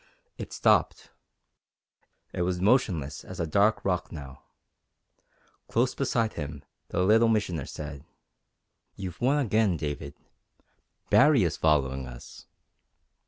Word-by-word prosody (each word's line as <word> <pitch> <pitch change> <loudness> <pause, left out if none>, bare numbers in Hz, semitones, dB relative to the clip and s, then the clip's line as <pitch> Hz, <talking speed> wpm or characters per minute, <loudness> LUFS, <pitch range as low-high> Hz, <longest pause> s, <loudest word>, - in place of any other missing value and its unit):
It - - -7
stopped. - - +1 1.2
It - - -3
was 90 0 -1
motionless 90 - +1
as - - -10
a 85 - 0
dark 100 +7 +2
rock 90 -2 -1
now. 70 -5 -9 1.3
Close 125 +2 +1
beside 115 -5 0
him 75 -2 -6 0.2
the 90 - -1
Little 110 +4 +5
Missioner 90 -10 0
said: 70 -2 -8 0.9
"You've 90 -3 -7
won 135 +4 +3
again, 110 - +2
David. 75 -1 -5 1.0
Baree 145 -6 +6
is 85 - 0
following 70 -4 +1
us!" - - -12
90 Hz, 115 wpm, -27 LUFS, 75-110 Hz, 1.3 s, Baree